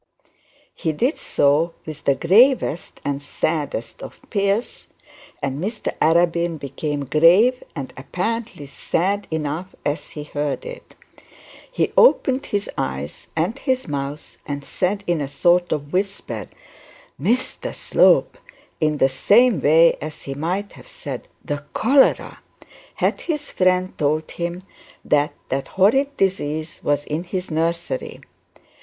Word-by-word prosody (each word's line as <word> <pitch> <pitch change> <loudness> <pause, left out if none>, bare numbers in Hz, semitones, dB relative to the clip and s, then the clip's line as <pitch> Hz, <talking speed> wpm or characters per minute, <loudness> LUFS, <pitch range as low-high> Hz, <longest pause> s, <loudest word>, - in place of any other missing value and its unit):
He 160 - -2
did 250 - 0
so 150 +4 +2
with 155 -2 -8
the 140 - +4
gravest 215 - +3
and 140 0 -1
saddest 145 -4 -3
of - - -9
fears, 200 +2 -1 0.6
and 140 +3 -2
Mr 215 +3 -3
Arabin 170 0 +3
became 145 +1 -4
grave 180 - +5
and 140 -4 -6
apparently 185 - -4
sad 195 +8 -1
enough 160 +3 -3
as 145 +1 -2
he 150 - -7
heard 150 - -3
it. - - -10 0.8
He - - 0
opened 275 - +4
his 205 0 -1
eyes 65 +3 -4
and 175 +11 -1
his 260 -2 -1
mouth 140 0 -5
and 145 -1 -4
said 200 +2 -1
in 175 -4 0
a 140 - -2
sort 175 +5 +2
of 145 0 -3
whisper, 195 +2 -2 0.7
'Mr 245 +4 -1
Slope!' - - +3 0.4
in 155 -2 +1
the 135 - +4
same 205 - +4
way 160 +4 +5
as 155 +1 -7
he 135 - -5
might 180 +8 -2
have - - -14
said, - - -7 0.2
The 145 -1 -3
Cholera!' 265 +4 +3 0.6
had - - 0
his 300 -3 -3
friend 185 0 +1
told 155 +1 0
him 175 +1 -4 0.4
that 145 0 +2 0.2
that 135 +1 -2
horrid 270 +9 +3
disease 160 -4 -1
was 145 0 +1
in 155 +3 -3
his 180 0 -4
nursery. 165 -3 -2
165 Hz, 130 wpm, -22 LUFS, 145-200 Hz, 0.8 s, grave